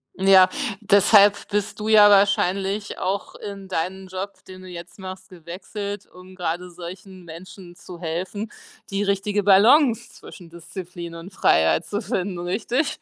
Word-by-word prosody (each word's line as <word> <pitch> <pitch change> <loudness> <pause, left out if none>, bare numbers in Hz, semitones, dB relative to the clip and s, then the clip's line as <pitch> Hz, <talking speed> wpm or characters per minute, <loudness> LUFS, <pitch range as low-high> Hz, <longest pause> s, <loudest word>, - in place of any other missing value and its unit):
Ja. 190 -1 +6 0.3
Deshalb 205 0 +5
bist 205 0 -2
du 210 - -4
ja 215 -1 +7
wahrscheinlich 200 0 +1
auch 195 +2 -3
in 200 -1 -8
deinen 190 +2 -4
Job, 190 +2 -6
den 185 0 -11
du 185 - -12
jetzt 175 +1 -10
machst, 185 0 -9
gewechselt, 195 +3 -7
um 185 +1 -16
grade 180 0 -4
solchen 180 +2 -11
Menschen 175 +2 -12
zu 175 0 -12
helfen, 185 +6 -4 0.4
die 195 +1 -1
richtige 200 +1 0
Balance 225 +6 +4
zwischen 175 -3 -13
Disziplin 170 0 -9
und 170 +4 -10
Freiheit 80 - +2
zu 205 - -3
finden, 195 -3 -3
richtig? 235 - -2
190 Hz, 145 wpm, -23 LUFS, 180-205 Hz, 0.4 s, ja